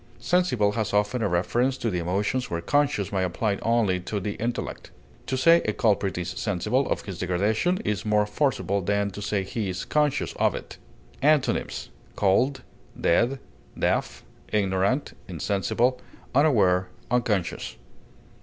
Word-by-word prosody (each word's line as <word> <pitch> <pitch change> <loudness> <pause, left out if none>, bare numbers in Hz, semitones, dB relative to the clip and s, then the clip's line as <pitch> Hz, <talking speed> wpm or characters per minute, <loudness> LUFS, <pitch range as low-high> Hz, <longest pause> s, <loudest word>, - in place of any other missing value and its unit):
Sensible 125 - +2
has 110 -1 -2
often 105 +4 +1
a 105 - +2
reference 120 +9 +1
to 115 - -2
the 90 - -1
emotions 100 +9 -1
where 85 - -2
conscious 140 0 +1
might 95 -2 0
apply 100 +3 0
only 115 -5 +1
to 100 +3 -3
the 100 +2 -3
intellect; 120 +1 -4 0.4
to 130 - -1
say 165 +6 +6
a - - 0
culprit 100 -4 +1
is 90 0 -3
sensible 105 +9 -1
of - - 0
his 95 -5 -7
degradation 105 - +1
is 105 0 -1
more 105 -1 +2
forcible 105 -3 0
than 100 +2 0
to 100 - -8
say 105 -1 -1
he 100 +1 -3
is 90 - -4
conscious 150 -2 +1
of - - +2
it. - - -8 0.4
Antonyms: 150 0 +1 0.3
cold, 130 +7 +2 0.4
dead, 120 +10 +2 0.4
deaf, - - -1 0.3
ignorant, 100 +5 0
insensible, 100 - 0 0.3
unaware, 100 -11 +3 0.2
unconscious. 110 -7 0
105 Hz, 145 wpm, -25 LUFS, 95-125 Hz, 0.4 s, say